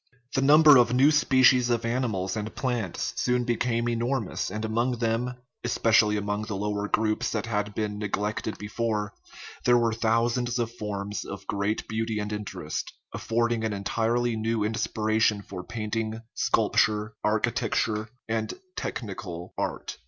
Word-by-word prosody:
The 135 Hz, -, +2 dB
number 150 Hz, +1 st, +8 dB
of 120 Hz, -1 st, +4 dB
new 135 Hz, +4 st, +6 dB
species 130 Hz, -4 st, +5 dB
of 115 Hz, -1 st, +1 dB
animals 115 Hz, -6 st, -1 dB
and 110 Hz, 0 st, -4 dB
plants 120 Hz, -8 st, -2 dB
soon 125 Hz, 0 st, +2 dB
became 120 Hz, 0 st, 0 dB
enormous, 120 Hz, -1 st, -1 dB
and 105 Hz, +3 st, -3 dB
among 120 Hz, +3 st, 0 dB
them 120 Hz, +1 st, -1 dB, 0.3 s
(especially 115 Hz, -3 st, +3 dB
among 105 Hz, +1 st, -2 dB
the 110 Hz, -2 st, -4 dB
lower 105 Hz, +1 st, -2 dB
groups 110 Hz, 0 st, +1 dB
that 105 Hz, -2 st, -2 dB
had 105 Hz, -2 st, -2 dB
been 105 Hz, -1 st, -2 dB
neglected 105 Hz, +1 st, -2 dB
before) 105 Hz, -1 st, -2 dB, 0.5 s
there 120 Hz, 0 st, +5 dB
were 115 Hz, -1 st, +2 dB
thousands 115 Hz, +2 st, +1 dB
of 115 Hz, -1 st, -1 dB
forms 105 Hz, -2 st, -4 dB
of 95 Hz, -1 st, -8 dB
great 100 Hz, +2 st, -1 dB
beauty 110 Hz, 0 st, -2 dB
and 105 Hz, 0 st, -3 dB
interest, 105 Hz, -1 st, -4 dB, 0.2 s
affording 115 Hz, 0 st, 0 dB
an 110 Hz, -1 st, -1 dB
entirely 115 Hz, +4 st, 0 dB
new 110 Hz, 0 st, 0 dB
inspiration 110 Hz, -1 st, +1 dB
for 90 Hz, -2 st, -7 dB
painting, 110 Hz, +1 st, -3 dB
sculp -, -, +1 dB
ture, 105 Hz, 0 st, +2 dB
architecture, 110 Hz, 0 st, 0 dB, 0.2 s
and 110 Hz, -1 st, -2 dB, 0.2 s
technical 90 Hz, -6 st, -5 dB
art. -, -, -4 dB
110 Hz, 145 wpm, -27 LUFS, 105-120 Hz, 0.5 s, number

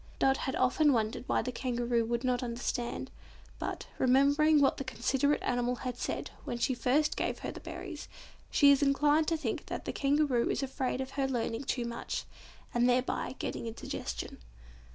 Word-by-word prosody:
Dot 270 Hz, 0 st, +4 dB
has 265 Hz, -, -2 dB
often 290 Hz, +3 st, +4 dB
wondered 220 Hz, +1 st, -1 dB
why -, -, +1 dB
the 255 Hz, -, -3 dB
Kangaroo 240 Hz, -2 st, 0 dB
would 235 Hz, +2 st, -1 dB
not 250 Hz, -1 st, +1 dB
understand, 245 Hz, +1 st, -3 dB, 0.5 s
but, -, -, -4 dB
remembering 285 Hz, +4 st, +5 dB
what 280 Hz, -, +3 dB
that 275 Hz, -, -5 dB
considerate 270 Hz, +3 st, +1 dB
animal 245 Hz, 0 st, 0 dB
had 250 Hz, 0 st, -4 dB
said -, -, -3 dB
when 240 Hz, -, -3 dB
she 260 Hz, +2 st, +1 dB
first 265 Hz, +5 st, +2 dB
gave -, -, -1 dB
her -, -, -2 dB
the -, -, -8 dB
berries, -, -, -7 dB, 0.4 s
she 285 Hz, -1 st, +6 dB
is 280 Hz, 0 st, +4 dB
inclined 290 Hz, +2 st, +3 dB
to 325 Hz, -, +1 dB
think 255 Hz, -8 st, -3 dB
that -, -, -5 dB
the -, -, -3 dB
Kangaroo 280 Hz, -4 st, +2 dB
is -, -, 0 dB
afraid 260 Hz, -1 st, -2 dB
of 265 Hz, 0 st, -5 dB
her 275 Hz, -1 st, 0 dB
learning 240 Hz, 0 st, -2 dB
too 245 Hz, -2 st, -1 dB
much, 235 Hz, 0 st, -4 dB, 0.5 s
and 240 Hz, +1 st, +3 dB
thereby 250 Hz, +1 st, 0 dB
getting -, -, -4 dB
indigestion. 220 Hz, -, -5 dB
255 Hz, 175 wpm, -31 LUFS, 240-280 Hz, 0.5 s, she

